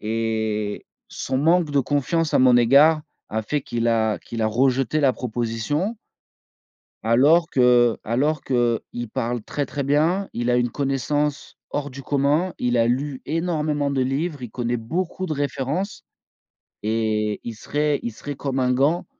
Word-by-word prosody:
et 110 -1 -2 0.2
son 130 - -3
manque 165 +1 +3
de 140 -1 +3
confiance 145 +4 0
à - - +5
mon 130 -1 +6
égard 145 +6 +5 0.3
a 110 +1 -2
fait 150 +6 -1
qu'il 120 -2 -2
a 110 -2 +1
qu'il 115 -1 -5
a - - +3
rejeté 130 +5 +1
la 135 -3 +4
proposition 125 - -2 1.1
alors 145 +9 +4
que 125 -2 +4
alors 145 +7 0
qu'il 120 -1 -1
parle 120 -1 -2
très, 145 +5 -3
très 140 - -4
bien, 160 +8 +1
il 120 +1 -1
a 120 - +3
une 120 0 +2
connaissance, 140 +1 -1
hors 145 -1 -3
du 135 +1 -9
commun, 145 +6 +1
il 120 0 0
a 115 0 +3
lu 135 +2 -1
énormément 150 -3 -1
de 135 -2 +1
livres, 140 +2 -2
il 120 - -6
connaît 120 +1 -2
beaucoup 170 +10 -3
de 155 - -3
références 145 +7 -3 0.8
et 110 -1 0
il 115 - -5
serait 145 +6 -1
il 120 - -3
serait 145 +6 -7
comme 135 -1 -3
un 125 0 +2
gant 150 +7 +1
135 Hz, 160 wpm, -23 LUFS, 120-150 Hz, 1.1 s, mon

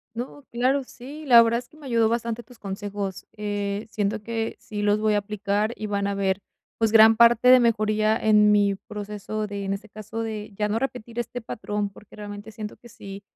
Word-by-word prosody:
No, 260 +4 -6
claro, 255 +4 +1
sí. 280 +5 -10
La 240 -4 +8
verdad 230 0 +3
es 245 - -9
que - - -21
me 300 -3 -12
ayudó 230 -3 +3
bastante 235 0 -2
tus 245 -1 -18
consejos. 200 -1 -5
Eh, 205 0 -3
siento 210 +1 -1
que 225 0 -3
sí 210 -1 -6
los 205 0 +3
voy 215 0 +2
a 205 - +3
aplicar 205 +1 -1
y 215 - -4
van 200 -1 -1
a - - -1
haber 195 -1 0 0.4
pues 225 -1 +2
gran 225 0 +8
parte 235 +2 +6
de 255 0 +9
mejoría 215 -2 +2
en 210 -2 +4
mi 205 -1 +4
proceso 210 +1 -5
de 200 -1 -5
en 195 0 -1
este 210 +2 -9
caso, 215 +2 -6
de 215 -1 -5
ya 210 0 0
no 215 - 0
repetir 240 -2 -5
este 240 +1 -3
patrón, 210 -2 -3
porque 205 +1 -16
realmente 205 +1 -8
siento 215 -1 -7
que 240 - -15
sí, 200 -2 -10
215 Hz, 210 wpm, -25 LUFS, 205-230 Hz, 0.4 s, de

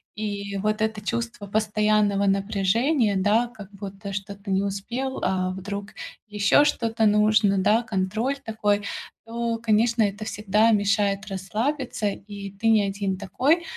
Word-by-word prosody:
И 200 -2 -4
вот 215 +2 -1
это 220 -1 0
чувство 230 -1 -4
постоянного 210 -1 +2
напряжения, 200 +5 +1
да, 210 +5 +2
как 205 -4 -12
будто 200 0 -8
что-то 200 0 -6
не 190 +1 +2
успел, 235 +7 -3
а 185 -1 0
вдруг 200 +2 -5 0.4
ещё 210 +7 +4
что-то 225 -4 +1
нужно, 210 -1 +4
да, 215 +5 +3
контроль 220 +5 -1
такой, 210 -4 0 0.4
то, 230 0 -2
конечно, 225 +1 +2
это 205 +1 -2
всегда 215 +1 +2
мешает 200 -1 +1
расслабиться, 215 +5 -2
и 200 0 -8
ты 200 +3 -3
не 220 -2 +5
один 195 -1 -2
такой. 260 - +1
210 Hz, 135 wpm, -24 LUFS, 200-225 Hz, 0.4 s, не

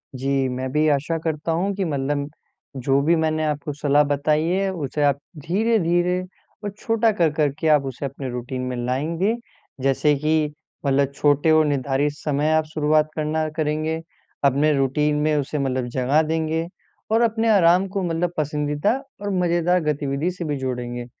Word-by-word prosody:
जी, 135 +1 0
मैं 130 +1 -3
भी 155 +1 +2
आशा 150 +3 0
करता 160 0 -2
हूँ 185 +5 0
कि 195 -1 -1
मतलब 145 -1 -1 0.6
जो 135 +1 +3
भी 165 +4 +3
मैंने 155 -1 0
आपको 150 -1 -2
सलाह 145 0 +3
बताई 145 +2 +1
है 190 +3 +1
उसे 150 -2 -2
आप 140 -1 +2 0.3
धीरे-धीरे 180 -3 +2 0.4
और 205 - -2
छोटा 225 0 +2
कर-कर 155 -5 +2
के 160 - 0
आप 140 -2 0
उसे 135 +1 -5
अपने 135 -1 -5
रूटीन 125 +1 -4
में - - -3
लाएँगे। 165 - 0 0.5
जैसे 135 +2 +2
कि 155 +1 0 0.3
मतलब 140 0 +2
छोटे 145 +2 +3
और 155 0 +5
निर्धारित 140 0 0
समय 150 0 0
आप 155 0 +2
शुरुआत 155 0 +2
करना 155 0 -1
करेंगे, 155 +1 -1 0.4
अपने 140 +3 +3
रूटीन 150 +3 +1
में 155 0 +2
उसे 145 +1 -1
मतलब 130 -2 -1
जगह 135 +5 +3
देंगे 160 +1 -1 0.4
और 225 +1 +4
अपने 225 0 +2
आराम 185 -1 +5
को 195 0 -3
मतलब 175 0 -1
पसंदीदा 150 +5 0 0.3
और 205 - -3
मज़ेदार 175 0 +2
गतिविधि 145 +2 -1
से 175 -2 -6
भी 145 -2 -2
जोड़ेंगे। 120 -2 -4
150 Hz, 165 wpm, -22 LUFS, 140-165 Hz, 0.6 s, और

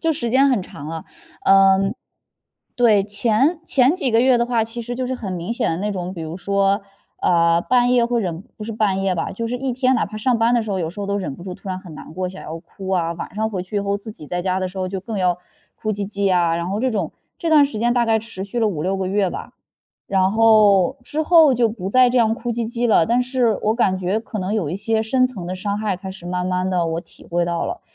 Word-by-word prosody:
就 325 -1 +1
时 240 -6 -3
间 270 +2 +4
很 250 -6 +2
长 150 -5 -9
了。 165 0 -6 0.4
嗯， 195 +1 +5 0.8
对， 220 -6 +4
前 235 - +1
前 270 -2 +3
几 315 -9 -1
个 225 0 +4
月 255 -1 +4
的 235 - +2
话， 235 -2 +1
其 230 +1 -5
实 245 +1 -5
就 255 0 -2
是 260 - -2
很 200 -7 -5
明 180 +5 -3
显 235 - 0
的 165 - -1
那 205 +4 -2
种， 180 -1 -4
比 170 - -8
如 160 +2 -6
说， 200 +1 +1 0.4
呃， 170 -1 +3
半 245 +5 +2
夜 245 -1 +4
会 235 0 0
忍 175 -3 -4
不 215 - -7
是 225 - -5
半 205 -3 0
夜 195 -1 0
吧， 170 - -2
就 230 +4 -4
是 245 +2 -2
一 265 +1 -2
天 255 +1 +2
哪 240 - +1
怕 215 +1 -9
上 240 +2 +1
班 230 +1 +3
的 240 - +3
时 220 - -5
候， 190 - -1
有 160 -2 -2
时 205 - -13
候 200 - -3
都 200 0 -1
忍 175 -8 -4
不 - - -11
住 185 -2 -6
突 190 - -11
然 185 - -3
很 175 -4 -11
难 155 - -11
过 185 +1 -2
想 185 +1 -9
要 160 +1 -6
哭 190 +3 -10
啊， 170 -3 +1
晚 170 - -7
上 220 +1 0
回 190 -4 -4
去 185 +3 -6
以 - - +2
后 200 0 -1
自 205 +2 -9
己 155 - -12
在 175 +3 -3
家 185 0 0
的 185 - -1
时 185 - -10
候 185 -1 -2
就 190 0 -4
更 210 +1 -5
要 180 -1 +2 0.4
哭 215 - -3
唧 200 -1 -4
唧 200 -2 0
啊， 170 -2 +2
然 170 +2 -3
后 200 - -1
这 255 +3 +1
种 195 -7 -2 0.2
这 335 - -2
段 300 -2 +7
时 275 -6 -4
间 240 +1 +2
大 240 -1 +2
概 225 -1 +3
持 195 -4 -6
续 235 +4 -3
了 220 - +3
5-6 185 +1 -2
个 190 -1 -2
月 195 -1 +1
吧。 - - -7 0.6
然 190 -1 +2
后 215 0 +4
之 300 +5 -3
后 315 -3 +6
就 240 -1 +2
不 200 -3 -5
再 255 +1 +5
这 250 - 0
样 225 -2 +4
哭 235 +1 -4
唧 235 - -3
唧 240 0 -1
了， 210 -7 +4
但 240 +2 +2
是 245 -4 +1
我 215 +1 +2
感 190 -6 +1
觉 190 +4 -1
可 220 -2 -7
能 190 +3 -2
有 175 -9 -1
一 180 - -2
些 220 +2 0
深 255 +3 +2
层 200 -9 -8
的 185 - -3
伤 200 +2 -2
害 210 -3 -1
开 190 +1 -8
始 190 -2 -12
慢 180 0 -2
慢 185 0 -1
地 175 -2 +1
我 165 0 -2
体 - - -16
会 175 0 +1
到 170 -1 -1
了， 355 - -4
205 Hz, 300 characters per minute, -21 LUFS, 185-235 Hz, 0.8 s, 段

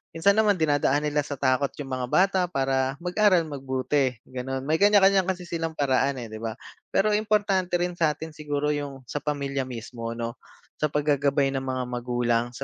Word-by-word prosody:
Minsan 165 +5 +4
naman 210 -1 +3
dinadaan 145 -2 +2
nila 150 0 0
sa 145 - -4
takot 130 +1 +2
yung 135 -3 -7
mga 130 -1 -2
bata 190 +5 +3
para 135 -3 0
mag-aral 180 -1 +3
mabuti 130 -2 -1
gano'n. 130 +1 -5
May 155 +3 0
kanya-kanya 195 -2 +5
kasi 185 -1 -2
silang 165 -2 -4
paraan, 140 -1 +1
eh 120 -4 -7
'di 110 - -7
ba? 115 0 -4 0.3
Pero 215 +2 +2
importante 205 -4 +1
rin 175 0 -1
sa'tin 160 0 0
siguro 150 -1 -2
yung 140 -3 -4
sa 145 +4 -4
pamilya 140 -3 -2
mismo 115 -1 -6
'no, 115 0 -5 0.4
sa 150 - +2
pag-gagabay 145 -2 +1
ng 135 -1 -2
mga 130 -1 -1
magulang 120 -1 0
sa 135 - -5
145 Hz, 175 wpm, -26 LUFS, 130-170 Hz, 0.4 s, kanya-kanya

